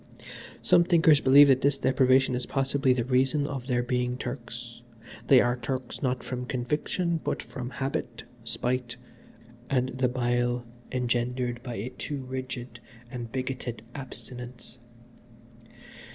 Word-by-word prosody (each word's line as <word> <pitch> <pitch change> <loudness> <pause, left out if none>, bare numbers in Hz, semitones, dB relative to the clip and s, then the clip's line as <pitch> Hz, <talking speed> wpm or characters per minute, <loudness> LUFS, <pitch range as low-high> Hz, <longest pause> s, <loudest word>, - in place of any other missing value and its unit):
Some 175 - +6
thinkers 165 -4 +5
believe 140 +2 +8
that 130 -1 +5
this 140 0 +2
deprivation 130 0 +3
is 125 0 -2
possibly 135 0 +1
the 125 -2 +2
reason 135 +3 +2
of 135 -3 -5
their 125 -2 +1
being 125 0 -1
Turks. 120 -2 -7 0.5
They 130 -2 +7
are 120 0 +2
Turks, 125 +1 -4
not 130 -2 -1
from 125 -1 -4
conviction, 150 +7 -1
but - - -2
from 125 -3 -6
habit, 135 -2 -3 0.2
spite, 120 +1 -2 0.7
and 130 -1 +1
the 130 0 0
bile 120 -1 0 0.3
engendered 125 0 -1
by 120 -2 -6
a 110 +5 -4
too 140 +2 -5
rigid 125 -2 -6 0.3
and 120 -3 -6
bigoted 130 -3 -4
abstinence. 125 -2 -9
125 Hz, 130 wpm, -28 LUFS, 120-135 Hz, 0.7 s, believe